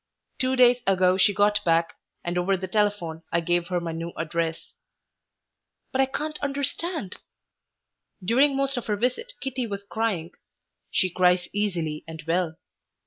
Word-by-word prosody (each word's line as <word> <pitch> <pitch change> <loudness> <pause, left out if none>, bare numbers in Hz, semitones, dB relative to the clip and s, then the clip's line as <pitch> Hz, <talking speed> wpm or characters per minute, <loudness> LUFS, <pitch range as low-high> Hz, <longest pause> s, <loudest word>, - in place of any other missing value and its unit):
Two 260 0 +2
days 250 -1 +6
ago 185 -1 +4
she 190 +2 +4
got 205 +1 +2
back, 165 0 +2 0.3
and 175 0 -2
over 185 +2 +2
the 190 +1 -4
telephone 195 -5 0
I 170 - +3
gave 175 +1 +1
her 180 -1 0
my 170 -1 -4
new 165 +1 -5
address. 165 0 -2 1.2
"But 265 - +2
I 265 - +3
can't 305 +3 -4
understand 280 - -2 0.5
" 185 - -22
During 270 +4 +4
most 275 -1 0
of 245 - -4
her 210 - +1
visit 255 - -1
Kitty 260 -2 -2
was 200 -1 -5
crying. 200 -6 -2 0.6
She 185 - +1
cries 180 0 +3
easily 175 -7 -1
and 160 -1 -8
well. 165 -1 0
195 Hz, 155 wpm, -26 LUFS, 170-250 Hz, 1.2 s, days